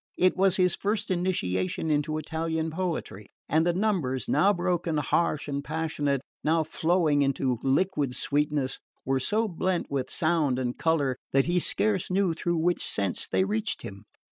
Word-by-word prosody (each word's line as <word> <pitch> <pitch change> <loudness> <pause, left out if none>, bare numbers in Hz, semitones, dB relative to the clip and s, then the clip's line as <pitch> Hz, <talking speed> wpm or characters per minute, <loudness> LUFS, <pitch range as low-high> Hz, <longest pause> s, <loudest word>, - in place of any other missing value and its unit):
It 185 0 +3
was 190 0 +3
his 180 -2 +3
first 205 -1 -1
initiation 160 - -1
into 150 +1 0
Italian 160 +1 -2
poetry, 160 - -4 0.2
and 160 +3 +2
the 175 - +3
numbers, 175 -10 0
now 200 - +4
broken, 175 -3 -1
harsh 150 0 0
and 140 -1 -3
passionate, 145 -2 -1 0.2
now 160 +1 +2
flowing 160 -2 +1
into 135 -3 0
liquid 140 -2 +1
sweetness, 145 -2 0 0.3
were 135 0 +1
so 215 - 0
blent 185 -2 -2
with 135 -2 -2
sound 155 -5 +1
and 125 -1 -2
colour 145 -6 +1 0.2
that 135 0 +4
he 175 +1 +2
scarce 200 +1 0
knew 185 -2 +2
through 170 +1 -1
which 175 +2 +1
sense 100 -3 -2
they - - +2
reached 210 +2 -2
him. 100 +1 -9
160 Hz, 160 wpm, -27 LUFS, 140-180 Hz, 0.3 s, now